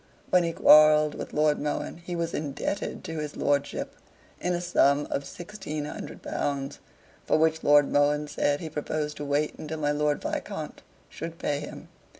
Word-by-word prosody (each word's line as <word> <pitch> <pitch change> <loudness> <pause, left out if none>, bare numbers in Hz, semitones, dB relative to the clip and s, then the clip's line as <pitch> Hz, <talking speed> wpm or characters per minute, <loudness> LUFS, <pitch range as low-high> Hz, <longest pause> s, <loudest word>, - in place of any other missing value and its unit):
When 180 -1 +5
he 170 - 0
quarrelled 155 -1 +6
with - - -6
Lord 150 0 +2
Mohun 150 +2 -3
he 175 +1 -6
was 170 0 -2
indebted 150 +7 -3
to 160 -1 -5
his 150 -1 -5
lordship 145 -1 -1 0.4
in 180 - 0
a - - -1
sum 145 -5 +3
of 140 - -1
sixteen 175 -5 -6
hundred - - -8
pounds, 140 -1 -3 0.4
for - - +2
which 160 0 +2
Lord 145 -1 +5
Mohun 145 +1 +2
said 145 0 0
he 160 - -5
proposed 150 0 -3
to 145 - -5
wait 145 +1 0
until 155 +1 -5
my 145 -1 0
Lord 150 0 +1
Viscount - - -5 0.3
should 165 +1 -7
pay 145 -3 -1
him. 150 - -9
150 Hz, 170 wpm, -27 LUFS, 145-160 Hz, 0.4 s, quarrelled